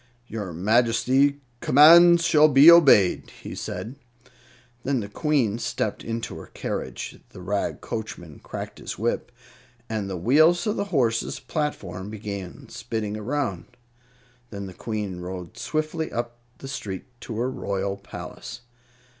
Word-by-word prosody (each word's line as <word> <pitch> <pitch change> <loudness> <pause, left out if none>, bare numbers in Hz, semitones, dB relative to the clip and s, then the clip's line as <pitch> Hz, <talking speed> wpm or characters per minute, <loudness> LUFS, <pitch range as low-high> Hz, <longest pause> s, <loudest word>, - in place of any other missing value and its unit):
"Your 105 -6 -5
Majesty's 120 - +3 0.3
commands 170 +6 +7
shall 155 -2 +6
be 145 +3 +8
obeyed," 135 - +5
he - - -6
said. 120 +5 -6 0.9
Then 135 -1 0
the 100 - -5
Queen 120 -2 0
stepped - - -3
into 115 0 -4
her - - -11
carriage, - - -5
the - - -12
rag 100 +2 -2
coachman 90 -9 -6
cracked - - -7
his - - -6
whip, 120 +2 -2 0.6
and 110 -4 -3
the 95 - -4
wheels 155 - +4
of 210 0 0
the 200 - -1
horses' 125 - 0
platform 100 - -4
began 100 -4 -7
spinning 105 -2 -4
around. 110 -3 -3 0.7
Then 100 -2 -6
the 95 - -9
Queen 105 -4 -4
rode 90 -1 -7
swiftly 155 +1 -3
up 120 0 -4 0.2
the 135 - -9
street 100 -8 -5 0.2
to 110 - -6
her 125 +3 -1
royal 100 -4 -3
palace. 100 +4 -9
115 Hz, 135 wpm, -25 LUFS, 100-145 Hz, 0.9 s, be